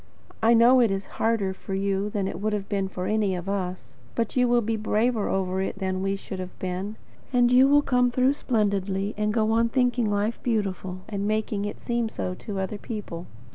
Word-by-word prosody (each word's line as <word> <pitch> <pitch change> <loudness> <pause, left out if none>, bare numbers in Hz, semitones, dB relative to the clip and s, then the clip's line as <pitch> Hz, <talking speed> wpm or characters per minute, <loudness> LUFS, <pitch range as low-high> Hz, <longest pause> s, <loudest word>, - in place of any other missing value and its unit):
I 230 +1 +5
know 240 +3 +7
it 235 -3 +4
is 195 0 -2 0.2
harder 220 -4 +1
for 190 0 -6
you 195 +1 0
than 200 -2 -1
it 185 - -5
would 215 0 0
have 200 -2 -2
been 195 -2 -1
for 185 -1 -5
any 210 -3 +1
of 175 +1 -6
us; 185 -7 -4 0.2
but 230 -2 -1
you 250 -1 +4
will 240 -1 +3
be 225 +1 0
braver 220 +1 +1
over 190 0 0
it 190 - -3
than 185 -1 -2
we 195 +1 0
should 195 -1 -7
have 185 0 -7
been, 185 +3 -4 0.4
and 245 -1 +4
you 255 +2 +7
will 290 +1 +5
come 250 -2 +3
through 255 +2 +3
splendidly, 200 -6 0
and 210 0 0
go 220 0 +1
on 230 +1 +3
thinking 245 -3 +1
life 205 +3 -1
beautiful, 190 -5 -2
and 200 -1 -2
making 215 -1 -1
it 205 - -5
seem 235 -1 -1
so 185 - -3
to 195 +2 -6
other 190 +2 -3
people. 195 -7 -6
210 Hz, 215 wpm, -26 LUFS, 195-230 Hz, 0.4 s, know